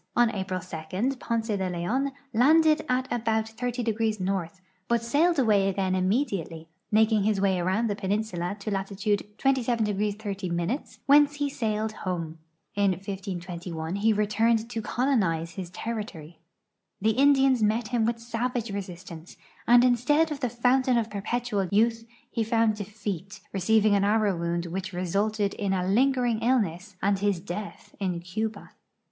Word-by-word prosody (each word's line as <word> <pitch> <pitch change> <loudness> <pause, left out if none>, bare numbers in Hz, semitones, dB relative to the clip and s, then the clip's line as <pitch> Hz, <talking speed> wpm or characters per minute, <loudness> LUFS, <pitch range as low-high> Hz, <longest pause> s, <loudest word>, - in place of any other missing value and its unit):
On 240 -1 +4
Ai>ril 190 -3 -3 0.5
2 - - -5
Ponce 230 -2 -2
de 190 -2 -1
Leon 220 +11 -1 0.2
landed 310 +6 +5
at 255 +1 +1
about 220 -2 0
30° 225 -2 -2
N.,but 185 +3 -3
sailed 310 +8 +2
away 210 -6 +3
again 190 -1 -1
immediately, 185 - -1 0.2
making 220 0 +4
his 210 +1 +1
Avay 190 -2 +2
around 190 +6 +1
the 205 - -1
i)eninsula 200 -2 -2
to 210 +1 -5
latitude 200 +1 -1
27° 225 -6 +1
30', 195 - -3
whence 290 +1 +5
he 285 -1 -1
sailed 220 -3 -1
home. 170 -6 -4 0.3
In 200 -2 +2
1521 180 -3 -5
he 220 +2 +3
returned 220 +2 +1
to 230 - -3
colonize 200 - 0
his 175 +1 -6
territory. 185 -6 -6 0.6
The 220 +3 +2
Indians 270 0 +4
met 215 +1 +1
him 240 -2 +1
with 230 +1 0
savage 235 0 -3
resistance, 180 -4 -8 0.3
and 240 +1 +7
instead 290 +6 +3
of 295 - -3
the 250 -3 -1
fountain 250 +1 +2
of 225 -2 -1
per; 200 -1 -4
])etual 215 -4 -1
youth 225 +2 +2 0.2
he 230 - 0
found 225 0 +2
defeat, 205 -1 -6
receiving 215 +2 +3
an 200 -1 +3
arrow 210 -1 +2
wound 170 0 -2
which 185 +2 -5
resulted 200 +3 0
in 200 -2 -1
a 180 -1 0
lingering 245 +1 +2
illness 210 -6 0
and 200 0 +2
his 200 -3 +1
death 200 +3 -7
in 185 -3 -1
Cuba. 210 +4 -4
210 Hz, 145 wpm, -27 LUFS, 190-235 Hz, 0.6 s, and